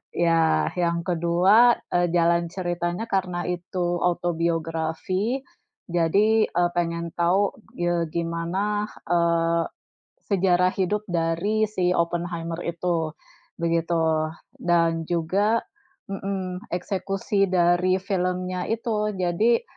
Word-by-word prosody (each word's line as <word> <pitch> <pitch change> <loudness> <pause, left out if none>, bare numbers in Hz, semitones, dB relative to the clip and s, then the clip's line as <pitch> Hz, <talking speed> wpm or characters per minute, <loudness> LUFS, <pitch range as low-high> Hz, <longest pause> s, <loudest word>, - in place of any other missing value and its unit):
ya, 165 -1 +2
yang 170 -1 0
kedua, 180 +8 +4 0.2
e 175 0 +2
jalan 170 0 +3
ceritanya 175 +2 -3
karena 185 -5 -1
itu 175 0 -2
autobiografi, 170 - -1 0.5
jadi, 200 +6 +3
e 175 - +1
pengen 170 -1 -1
tahu, 185 +4 +2 0.3
ye 175 -1 +1
gimana, 175 +5 -1 0.2
eee, 170 -1 +2 0.7
sejarah 180 -1 +3
hidup 205 +3 0
dari 175 +6 +1
si 180 -3 +1
Oppenheimer 170 -1 -2
itu, 165 -2 -1 0.5
begitu. 165 -2 +1 0.3
Dan 165 -1 +2
juga 195 +7 +2 0.5
Mhm. 190 -1 -4
Eksekusi 195 +2 -1
dari 180 0 +3
filmnya 185 -1 -2
itu, 215 -2 -1
jadi 190 +6 +2
175 Hz, 95 wpm, -24 LUFS, 170-190 Hz, 0.7 s, kedua